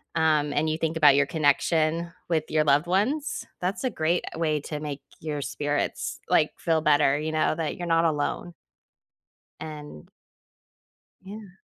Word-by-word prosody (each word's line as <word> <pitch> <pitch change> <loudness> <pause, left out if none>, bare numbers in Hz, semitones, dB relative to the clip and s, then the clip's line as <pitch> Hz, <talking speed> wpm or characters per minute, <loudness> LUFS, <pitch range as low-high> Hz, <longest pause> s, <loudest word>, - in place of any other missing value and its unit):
um, 155 -2 +2
and 155 +2 +1
you 155 - -1
think 165 0 -2
about 145 -3 +6
your 145 - +4
connection 160 +2 +1 0.2
with 160 -3 +1
your 155 -1 +2
loved 150 +3 +3
ones. 255 - 0
That's 185 +7 -2
a 255 - +1
great 170 -3 0
way 155 -2 0
to 150 +1 -5
make 145 -2 -5 0.2
your 150 -2 -4
spirits, 145 +1 -2
like, - - +3
feel 165 -1 +1
better, 145 -2 +3
you 155 +1 -3
know, 155 0 +1
that 160 -2 -3
you're 175 -1 -5
not 165 0 +3
alone. 160 +3 -1 1.1
And 150 - -9 1.2
Yeah. 195 -2 -11
155 Hz, 155 wpm, -26 LUFS, 150-170 Hz, 1.2 s, about